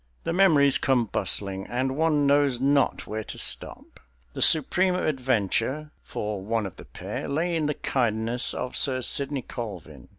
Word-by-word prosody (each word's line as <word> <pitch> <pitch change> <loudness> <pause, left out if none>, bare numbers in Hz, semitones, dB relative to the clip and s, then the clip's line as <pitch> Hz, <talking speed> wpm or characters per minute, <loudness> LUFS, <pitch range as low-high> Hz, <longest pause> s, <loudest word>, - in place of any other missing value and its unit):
The 165 - -2
memories 155 -7 +4
come 130 -3 +2
bustling, 95 -2 -1
and 130 +2 -2
one 155 -1 +2
knows 140 -3 +3
not 140 +1 +1
where 110 +1 -5
to - - -8
stop. - - -5 0.3
The - - -6
supreme 180 +4 +4
adventure, 130 - -1
for 105 -2 -5
one 110 +2 -1
of 95 - -8
the - - -12
pair, - - -6
lay 165 +4 -1
in 155 -2 0
the 150 - -1
kindness 115 -1 0
of 125 - -4
Sir 130 -2 +2
Sidney 140 +1 0
Colvin. 85 - -8
130 Hz, 160 wpm, -25 LUFS, 110-150 Hz, 0.3 s, memories